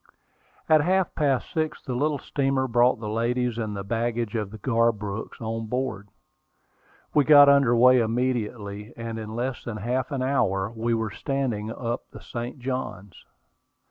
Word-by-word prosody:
At 155 -1 +5
half 185 +3 +1
past 140 -4 0
six 155 -1 -1
the 130 - -4
little 145 +4 0
steamer 135 -1 0
brought 120 0 +3
the 110 - -5
ladies 120 +2 -1
and 105 -3 -3
the 100 - -4
baggage 115 +1 -2
of 105 -4 -2
the 110 - -9
Garbrooks 110 -2 -1
on 115 0 -4
board. 125 -5 -3 1.0
We 150 - +5
got 145 0 +8
under 140 -4 +5
way 125 +2 +6
immediately, 110 -3 -2
and 115 -1 -5
in 110 0 -6
less 125 +2 -3
than 115 -3 -5
half 120 +4 -2
an 135 -2 -1
hour 100 -7 +1
we 115 +1 0
were 110 -2 -2
standing 125 -7 -2
up 115 +1 -4
the - - -11
St. 120 +3 -6
Johns. 120 -7 -5
120 Hz, 160 wpm, -25 LUFS, 110-130 Hz, 1.0 s, got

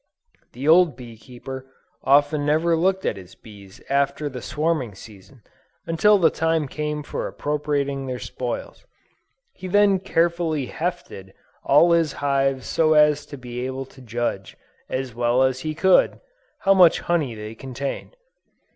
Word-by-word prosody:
The 130 +4 -5
old 165 -3 +5
bee 120 -2 -11
keeper 130 +3 -10 0.4
often 145 +2 +3
never 160 +3 +2
looked 190 +3 0
at 100 - -1
his 95 -1 -13
bees 100 -3 -15
after 140 +2 0
the 125 -2 -8
swarming 150 -9 -2
season, 105 +4 -15 0.4
until 205 +6 +4
the 170 -4 +3
time 160 -2 0
came 150 +1 -4
for - - -4
appropriating 145 -2 -2
their 130 -1 -3
spoils. 125 0 -6 0.7
He 185 - -8
then 200 0 +3
carefully 165 -4 0
"hefted" 95 - -5 0.3
all 160 +5 +5
his 165 -3 +2
hives 135 -2 0
so 155 -1 +2
as 150 -1 +3
to 145 - -9
be 125 -1 -6
able 130 0 -5
to 130 - -15
judge 115 -5 -4 0.3
as 130 -2 -3
well 120 +2 +2
as 130 -1 +1
he 155 +2 -4
could, 190 +3 +3 0.4
how 195 -1 +4
much 180 -4 +5
honey 155 -9 -1
they 105 0 -8
contained. 135 - -6
140 Hz, 145 wpm, -23 LUFS, 125-160 Hz, 0.7 s, old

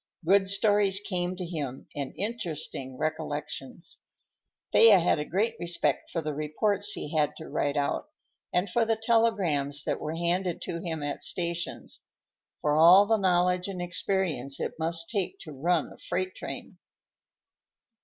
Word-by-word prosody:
Good 190 +2 +4
stories 200 -1 +4
came 180 -3 -2
to 180 -1 -5
him, 145 -7 -5
and 140 -2 -3
interesting 165 - -4
recollections. 150 0 -4 0.7
Thea 225 -3 +8
had 165 -2 +2
a 150 - -2
great 215 +8 0
respect 170 -4 0
for 165 - -3
the 150 0 -2
reports 200 +8 0
he 150 +2 -5
had 150 -1 +2
to 160 - -8
write 145 0 -1
out, 145 - -1 0.4
and 180 +3 +1
for 235 +5 +1
the 225 0 +1
telegrams 205 - +1
that - - -2
were 155 +1 -3
handed 175 +1 0
to 170 - -3
him 160 -4 -4
at 145 0 -3
stations; 170 -1 -4 0.5
for 150 0 +2
all 175 +6 +8
the 225 +1 +3
knowledge 180 -1 +2
and 190 -2 -5
experience 175 -6 -1
it - - -2
must 165 +1 +1
take 200 -5 -2
to 160 - -9
run 160 +3 0
a - - -17
freight 185 0 -2
train. - - -7
175 Hz, 155 wpm, -28 LUFS, 150-195 Hz, 0.7 s, Thea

